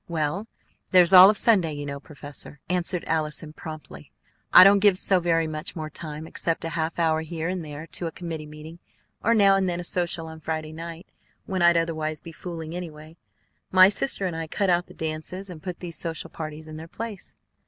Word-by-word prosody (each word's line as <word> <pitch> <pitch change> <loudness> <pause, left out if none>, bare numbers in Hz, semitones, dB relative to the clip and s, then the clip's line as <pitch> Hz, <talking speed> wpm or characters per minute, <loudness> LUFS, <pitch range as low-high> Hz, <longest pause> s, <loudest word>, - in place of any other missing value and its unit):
"Well, 170 +5 -2 0.4
there's 180 -1 +5
all 185 +1 +11
of 210 - +1
Sunday, 190 -10 +4
you 145 0 -5
know, 140 0 -5
professor," 145 0 -10
answered 180 0 -1
Allison 155 -1 -2
promptly. 155 - -10 0.4
"I - - +11
don't 200 +1 +7
give 200 -2 +4
so 190 -1 +3
very 165 -1 +1
much 155 +3 -5
more 155 -2 -5
time, 155 -1 -6
except 165 0 -3
a - - -2
half 165 0 -3
hour 160 -2 +2
here 160 0 -4
and 180 -1 -3
there 150 +1 -8
to 170 +1 -2
a - - -5
committee 160 -2 -6
meeting, 155 +3 -11 0.4
or 230 +1 +3
now 200 -2 +5
and 190 -1 +1
then 175 0 -2
a - - -4
social 175 -1 -1
on 160 0 -9
Friday 155 0 -4
night, 165 +2 -8 0.4
when 190 -2 -2
I'd 170 0 +5
otherwise 155 -2 -1
be 165 - -11
fooling, 165 -1 -7
anyway. 160 -2 -8 0.6
My 185 +1 +8
sister 205 -1 0
and 175 -3 -2
I 165 0 -4
cut 195 +3 0
out 175 0 +1
the - - -15
dances, 160 +5 -5
and 160 -3 -10
put 180 0 -7
these 170 -2 -6
social 165 -2 -4
parties 155 0 -7
in 155 0 -8
their 160 +1 -9
place." 215 +1 -7
165 Hz, 205 wpm, -25 LUFS, 155-180 Hz, 0.6 s, all